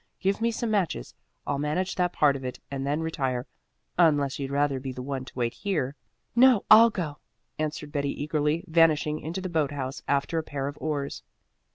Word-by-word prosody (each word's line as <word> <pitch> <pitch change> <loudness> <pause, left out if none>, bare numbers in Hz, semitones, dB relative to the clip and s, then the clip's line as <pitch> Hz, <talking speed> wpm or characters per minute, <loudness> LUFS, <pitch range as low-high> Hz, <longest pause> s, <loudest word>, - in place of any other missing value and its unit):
Give 195 +2 0
me 230 - +3
some 230 0 -2
matches. 185 - -1 0.3
I'll 140 - -1
manage 155 +6 -1
that 180 -1 +1
part 145 -4 +3
of 135 - -6
it 125 0 -5
and 135 0 -3
then 150 +3 0
retire, 135 -6 -2 0.5
unless 145 -5 +3
you'd 135 -1 -3
rather 140 -1 +1
be 130 0 -5
the 125 0 -7
one 135 -1 -4
to - - -12
wait 120 -1 0
here." 155 -9 -2 0.4
"No, 245 -3 +6
I'll 230 +1 +10
go," 170 -9 -4 0.4
answered 155 -1 -3
Betty 140 0 -2
eagerly, 150 +2 0
vanishing 155 -2 +3
into 170 +5 -4
the 185 - -3
boat 160 -5 +1
house 135 -2 -5
after 140 +4 +1
a - - -3
pair 140 -2 -4
of 145 - -5
oars. 145 -3 -3
150 Hz, 195 wpm, -27 LUFS, 140-170 Hz, 0.5 s, I'll